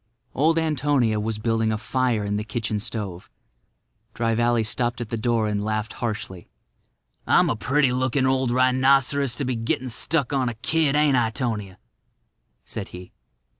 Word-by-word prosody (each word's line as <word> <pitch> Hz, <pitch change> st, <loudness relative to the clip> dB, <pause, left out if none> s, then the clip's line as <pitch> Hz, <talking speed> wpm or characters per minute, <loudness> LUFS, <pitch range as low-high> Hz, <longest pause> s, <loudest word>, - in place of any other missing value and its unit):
Old 160 Hz, +4 st, +2 dB
Antonia 145 Hz, -8 st, +1 dB
was 110 Hz, 0 st, -2 dB
building 115 Hz, 0 st, 0 dB
a 110 Hz, -, 0 dB
fire 120 Hz, -1 st, 0 dB
in 100 Hz, 0 st, -1 dB
the 105 Hz, -, -1 dB
kitchen 110 Hz, -1 st, -3 dB
stove. 105 Hz, -5 st, -6 dB, 0.9 s
Dry 115 Hz, -1 st, 0 dB
Valley 120 Hz, 0 st, +2 dB
stopped 120 Hz, +2 st, -1 dB
at 120 Hz, -3 st, -5 dB
the -, -, 0 dB
door 115 Hz, -1 st, +1 dB
and 105 Hz, -1 st, -1 dB
laughed 110 Hz, +1 st, -2 dB
harshly. 105 Hz, -6 st, -5 dB, 0.8 s
"I'm -, -, +4 dB
a -, -, -1 dB
pretty 130 Hz, +5 st, +2 dB
looking 130 Hz, +1 st, +1 dB
old 130 Hz, -1 st, +1 dB
rhinoceros 130 Hz, +1 st, +3 dB
to 140 Hz, -, -3 dB
be 130 Hz, -1 st, -1 dB
gettin' 115 Hz, +2 st, -2 dB
stuck 140 Hz, +3 st, -1 dB
on 130 Hz, -3 st, +1 dB
a 120 Hz, -, -6 dB
kid, 150 Hz, +4 st, +1 dB
ain't 150 Hz, -3 st, +4 dB
I, 115 Hz, -2 st, +2 dB
'Tonia?" 110 Hz, -6 st, -3 dB, 0.9 s
said -, -, -6 dB
he. 90 Hz, 0 st, -11 dB
120 Hz, 165 wpm, -24 LUFS, 110-130 Hz, 0.9 s, I'm